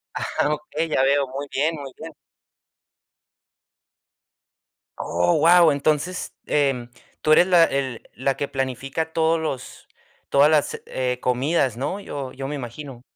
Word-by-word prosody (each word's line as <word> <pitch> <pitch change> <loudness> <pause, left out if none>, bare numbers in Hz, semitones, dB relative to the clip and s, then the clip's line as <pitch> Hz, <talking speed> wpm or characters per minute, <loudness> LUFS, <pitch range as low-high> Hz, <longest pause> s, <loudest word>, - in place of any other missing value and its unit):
Ajá, 150 - -1
okey, 155 +2 -4
ya 130 - +2
veo. 140 0 +2
Muy 140 +2 -6
bien, 155 +4 0
muy 140 -3 -8
bien. 160 0 -9 2.9
Oh, 85 +1 +1
guau. 170 0 +6
Entonces, 150 +5 -1 0.2
em, 135 -5 0 0.3
tú 155 - +1
eres 175 +4 +6
la 175 -3 +6
el 135 -5 -3
la 135 +2 -1
que 140 - -2
planifica 135 +4 -3
todos 160 0 +2
los 145 -5 -6 0.4
todas 140 +2 +5
las, 150 -2 +1
eh, 125 -1 -2
comidas, 130 0 +1
¿no? 140 +10 -3
Yo 140 -9 -6
yo 135 +1 -6
me 150 - -4
imagino. 125 0 -8
140 Hz, 135 wpm, -23 LUFS, 130-155 Hz, 2.9 s, guau